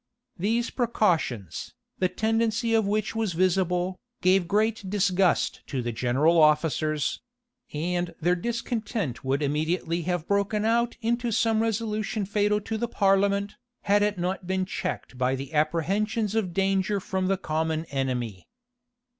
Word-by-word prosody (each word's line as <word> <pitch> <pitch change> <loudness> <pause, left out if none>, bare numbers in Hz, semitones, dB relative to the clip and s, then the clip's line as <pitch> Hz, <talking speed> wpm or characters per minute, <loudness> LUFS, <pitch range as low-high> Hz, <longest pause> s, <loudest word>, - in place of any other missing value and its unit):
These 230 +5 0
precautions, 170 - -1 0.2
the 185 - +2
tendency 225 +1 0
of 220 -3 +3
which 215 +1 -1
was 220 -5 -1
visible, 180 +1 +1 0.2
gave 185 -1 +4
great 210 0 0
disgust 190 -2 +2
to 130 -4 -3
the 120 - -2
general 135 +8 +3
officers; 155 -1 +2 0.5
and 175 +3 -2
their 175 +2 +2
discontent 220 - -3
would 135 +3 0
immediately 160 +4 0
have 175 -1 -2
broken 200 +1 +1
out 235 +1 +1
into 235 +1 0
some 225 0 +2
resolution 215 -2 -1
fatal 210 +1 +1
to 220 +1 -4
the 235 - 0
parliament, 200 -1 +1 0.2
had 205 +1 +3
it 205 -1 +1
not 180 +1 -2
been 190 0 0
checked 130 -7 -5
by 130 +1 +2
the 135 +2 -7
apprehensions 195 +8 0
of 220 -5 0
danger 195 +2 +1
from 190 0 -2
the 195 0 +1
common 160 -2 -1
enemy. 125 -8 -2
190 Hz, 140 wpm, -26 LUFS, 160-215 Hz, 0.5 s, gave